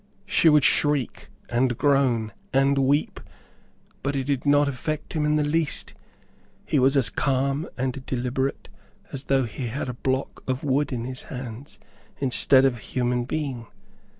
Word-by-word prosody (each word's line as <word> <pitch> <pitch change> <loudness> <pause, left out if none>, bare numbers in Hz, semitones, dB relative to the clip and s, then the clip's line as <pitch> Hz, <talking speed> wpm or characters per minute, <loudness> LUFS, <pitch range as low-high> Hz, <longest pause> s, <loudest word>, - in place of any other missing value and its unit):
She 170 - +4
would 150 -2 +5
shriek, 145 -2 +1 0.2
and 120 0 +1
groan, 130 -6 +2 0.2
and 135 +1 +3
weep, 140 +3 +1 0.8
but 140 +1 -2
it 135 - 0
did 140 0 -2
not 145 0 +4
affect 145 +3 -4
him 155 -2 0
in 150 0 +2
the 150 - +2
least. 155 +1 -1 0.7
He 145 - +1
was 135 +2 +4
as 135 - +2
calm, 140 +2 0
and 130 0 -2
deliberate 130 +2 -2 0.4
as 135 0 -5
though 135 -1 +2
he 120 +2 -5
had 125 +3 -4
a - - -3
block 130 +2 -3
of 130 0 -2
wood 145 +1 +1
in 120 -2 -3
his 130 0 -5
hands, 125 -1 -7 0.4
instead 135 0 +4
of 130 -3 +2
a - - -13
human 125 -1 -1
being. 135 -5 -4
135 Hz, 160 wpm, -25 LUFS, 125-145 Hz, 0.8 s, would